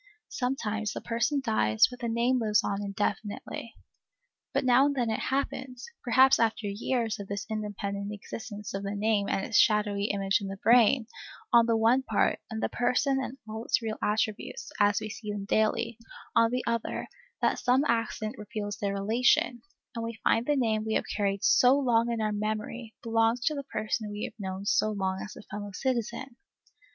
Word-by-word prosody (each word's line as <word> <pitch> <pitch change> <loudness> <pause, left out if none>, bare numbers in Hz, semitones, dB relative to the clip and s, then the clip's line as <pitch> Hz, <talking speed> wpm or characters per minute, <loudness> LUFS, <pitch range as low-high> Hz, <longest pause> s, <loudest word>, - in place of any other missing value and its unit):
Sometimes 220 -5 -2
the - - -4
person 240 +5 0
dies, 110 - +4
but 250 0 -11
the 240 - -3
name 235 +3 +2
lives 215 -2 +2
on 200 0 -2
indefinitely. 205 +2 -4 0.8
But - - 0
now 255 +2 +5
and 285 - -1
then 240 -4 0
it 220 - -1
happens, 260 -2 -3 0.2
perhaps 260 +3 +5
after 225 -1 +1
years 220 +2 -1
of 200 - -6
this 200 0 -4
independent 205 -1 -3
existence 210 0 -7
of 195 - -3
the 200 +1 -4
name 205 -1 +1
and 195 - 0
its 225 - +3
shadowy 210 -2 +3
image 195 0 +1
in 200 - -4
the 195 0 -6
brain, 235 +2 +5 0.5
on 235 -1 +6
the 230 -1 +3
one 230 +4 +4
part, - - +1
and 220 -1 -4
the - - +3
person 260 +3 +1
and 260 - -6
all 220 +1 -5
its - - +2
real 220 -2 -4
attributes, 215 0 -2
as 205 -1 +4
we 215 - -5
see 210 0 -6
them 205 -1 -4
daily, 225 +2 +1 0.4
on 230 0 +5
the 250 +1 -1
other, 230 -1 -2 0.4
that - - +2
some 255 +3 +3
accident 230 0 -1
reveals 205 -1 -5
their 200 -1 -1
relation, 235 +3 +2 0.3
and 230 - -4
we 230 0 -5
find 230 +2 +2
the 295 - +3
name 220 -5 +1
we 220 0 -1
have - - 0
carried 200 -1 0
so 255 +2 +5
long 240 -4 +2
in 230 - -2
our 215 -1 0
memory 215 +2 -4
belongs 225 +1 +2
to 310 - +2
the 280 -1 -4
person 215 -1 -2
we 205 +1 -5
have - - -4
known 190 0 -5
so 215 0 +2
long 190 -2 -2
as 210 - -9
a - - -11
fellow 205 -1 -7
citizen. 240 +2 -3
220 Hz, 190 wpm, -28 LUFS, 205-240 Hz, 0.8 s, on